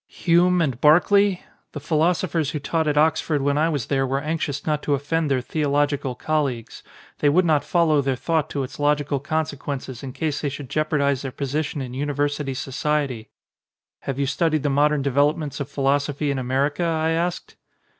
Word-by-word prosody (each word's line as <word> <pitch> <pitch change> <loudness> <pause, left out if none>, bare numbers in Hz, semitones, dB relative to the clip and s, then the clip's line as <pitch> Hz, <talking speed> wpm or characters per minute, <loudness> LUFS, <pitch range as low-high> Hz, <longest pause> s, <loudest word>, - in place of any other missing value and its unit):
"Hume 175 0 +2
and 130 -5 -2
Berkeley? 190 +5 +4 0.3
The 145 - -5
philosophers 160 +1 0
who 150 - -3
taught 160 +2 -1
at 150 0 0
Oxford 155 -1 +2
when 140 0 +1
I 155 +3 +2
was 145 -8 -2
there 135 -1 0
were 135 +1 0
anxious 150 -2 -3
not 150 -1 0
to 145 - +1
offend 150 +3 -1
their 130 -2 +1
theological 145 -2 0
colleagues. 140 -6 -2 0.4
They 145 - +3
would 180 +5 +3
not 155 -3 +2
follow 160 -4 +2
their 135 -1 0
thought 155 +3 -1
to 140 - -2
its 130 - -8
logical 145 -1 +1
con 155 +3 -1
sequences 135 -3 -6
in 135 - -6
case 150 0 -2
they 145 - -1
should 140 -2 -8
jeopardise 145 -3 +1
their 135 - -5
position 145 +1 -3
in 125 -1 -7
university 145 0 -2
society. 135 -3 -2 0.7
"Have 135 -1 -4
you 140 - 0
studied 155 +1 0
the 145 - +1
modern 145 0 +2
developments 145 +2 +1
of 140 - -4
philosophy 140 +1 0
in 135 - -2
America?" 135 +5 0
I 160 -1 0
asked. 170 +2 -2
145 Hz, 180 wpm, -23 LUFS, 140-155 Hz, 0.7 s, Berkeley